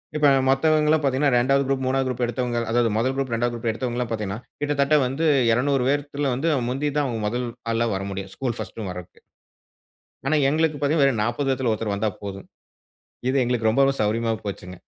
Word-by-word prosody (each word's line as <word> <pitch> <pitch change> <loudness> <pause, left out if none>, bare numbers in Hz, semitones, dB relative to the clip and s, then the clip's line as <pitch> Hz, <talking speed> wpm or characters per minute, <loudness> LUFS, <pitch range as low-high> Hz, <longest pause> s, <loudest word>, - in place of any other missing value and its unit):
இப்ப 150 -1 +4 0.2
மத்தவங்கல்லாம் 155 +2 +3
பாத்தீங்கன்னா, 140 +1 +2
2வது 135 +3 +3
குரூப், 135 -1 0
3வது 130 0 +1
குரூப் 125 -1 -2
எடுத்தவங்க 120 0 -2
அதாவது 120 -1 +2
1 130 +4 +1
குரூப், 135 -2 -2
2வது 120 +1 0
குரூப் 115 0 -2
எடுத்தவங்க 120 +1 -3
எல்லாம் 125 -2 -2
பாத்தீங்கன்னா, 105 -2 -3 0.2
கிட்டத்தட்ட 145 0 +2
வந்து 135 +6 -1 0.3
200 130 +2 +2
பேத்துல, 145 0 -1
வந்து 160 +6 0 0.2
முந்தி 140 +4 -1
தான் 145 - +2
அவங்க 115 -3 -3
முதல் 120 +3 -2 0.2
ஆளா 115 +1 +1
வர 95 - -3
முடியும். 95 0 -6
ஸ்கூல் 125 -3 -3
1 115 - -6
வரதுக்கு. 90 -1 -10 1.1
ஆனா, 155 - +3
எங்களுக்கு 155 0 +1
பாத்தீங்கன்னா, 145 0 +3
வெறும் 115 -6 +1
40 135 +4 -1
பேர்ல 125 -3 0
ஒருத்தர் 105 -2 -2
வந்தா 105 +1 0
போதும். 100 -1 -7 0.8
இது 135 - 0
எங்களுக்கு 115 -2 +1
ரொம்ப 135 +5 +3 0.2
சௌரியமா 115 +2 0
போச்சுங்க. 90 -2 -6
125 Hz, 180 wpm, -23 LUFS, 115-140 Hz, 1.1 s, இப்ப